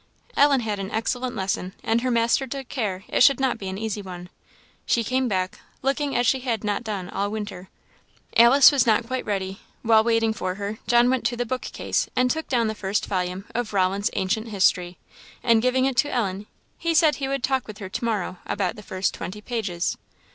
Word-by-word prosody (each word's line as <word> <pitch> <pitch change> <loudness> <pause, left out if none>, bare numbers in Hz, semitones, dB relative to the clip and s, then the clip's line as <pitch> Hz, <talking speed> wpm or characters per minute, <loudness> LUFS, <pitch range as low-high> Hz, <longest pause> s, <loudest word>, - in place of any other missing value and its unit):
Ellen 280 -2 +5
had 210 -3 -3
an 195 0 -4
excellent 245 +3 -2
lesson, 190 -2 -2
and 230 +1 +1
her 255 - 0
master 235 +3 +2
took 270 0 -6
care 200 -7 -2
it - - 0
should 275 +1 +6
not 260 -3 0
be 195 - -5
an 190 - -5
easy 215 -1 -3
one. 180 -2 -9 0.5
She 235 - +1
came 255 +3 0
back, 185 -3 -2 0.2
looking 275 +1 0
as 245 - +2
she 265 +3 +3
had 235 -4 -2
not 205 +1 -1
done 205 -5 -4
all 200 +1 -2
winter. 205 -3 -6 0.7
Alice 240 +5 +8
was 270 -5 +2
not 225 +1 +3
quite 255 +1 -3
ready; 195 -1 -3 0.2
while 220 -1 +5
waiting 225 -1 +2
for 185 -4 -3
her, 205 +2 -5
John 240 +1 +5
went 260 -2 0
to 240 - 0
the 245 - -1
book 255 +2 -3
case - - -2
and 250 0 +3
took 320 0 -3
down 240 -3 +1
the 220 - -1
first 200 0 -1
volume 185 0 -2
of 235 -2 -2
Rollin's 195 +2 +1
Ancient 215 +4 -1
History; 180 -4 +1 0.5
and 230 -2 +4
giving 255 +2 +2
it 265 -2 -1
to 290 +4 +2
Ellen, 205 -4 -2 0.3
he 335 -1 0
said 310 -1 +4
he 275 - -2
would 275 -2 -2
talk 265 -2 0
with 215 -1 -8
her 200 -2 -7
to 205 - -5
morrow 205 -5 -2
about 195 -2 -1
the - - -8
first 190 -2 -2
twenty 200 +4 -6
pages. 210 -6 -2
220 Hz, 210 wpm, -24 LUFS, 195-250 Hz, 0.7 s, Alice